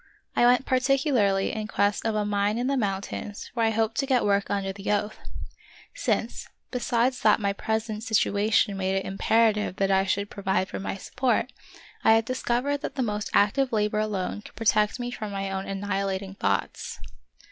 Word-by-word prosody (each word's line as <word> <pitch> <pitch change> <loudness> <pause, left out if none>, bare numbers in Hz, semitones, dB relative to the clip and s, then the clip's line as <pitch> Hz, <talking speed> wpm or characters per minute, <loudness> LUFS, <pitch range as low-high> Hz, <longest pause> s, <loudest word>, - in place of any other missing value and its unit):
I 240 - +5
went 250 +2 +4
particularly 255 -7 +2
in 215 -1 -3
quest 205 +1 0
of 220 - 0
a 210 -1 0
mine 205 +1 0
in 245 - -1
the 275 - +1
monntains 205 -2 -3
where 230 -2 +2
I - - +3
hoped 225 0 0
to 275 - 0
get 255 -4 +2
work 200 -1 +1
under 195 -1 -1
the 200 +1 -3
oath; 210 +1 -1 0.7
since, - - -2 0.2
besides 250 0 +1
that 215 - +4
my 200 -1 0
present 220 +1 -2
98 220 0 +1
The - - -2
Wonderful 205 +1 0
History - - -3
situation 200 -3 +2
made 190 0 0
it 195 - -1
imperative 210 0 +2
that 195 0 +1
I 190 0 +4
should 200 +1 -1
pro 200 - -8
vide 190 0 0
for - - -5
my 195 - -4
support, 245 +4 -1 0.5
I 220 - +6
had 225 0 +3
discovered 255 +3 0
that - - -5
the 265 - 0
most 210 -2 -2
active 250 +6 +3
labor 210 -1 +1
alone 210 -2 -2
could - - -14
protect 215 0 +2
me 245 0 -3
from 215 -3 -5
my 195 -1 -3
own 190 0 -3
annihilating 195 -1 -2
thoughts. 100 - -2
210 Hz, 200 wpm, -26 LUFS, 200-235 Hz, 0.7 s, I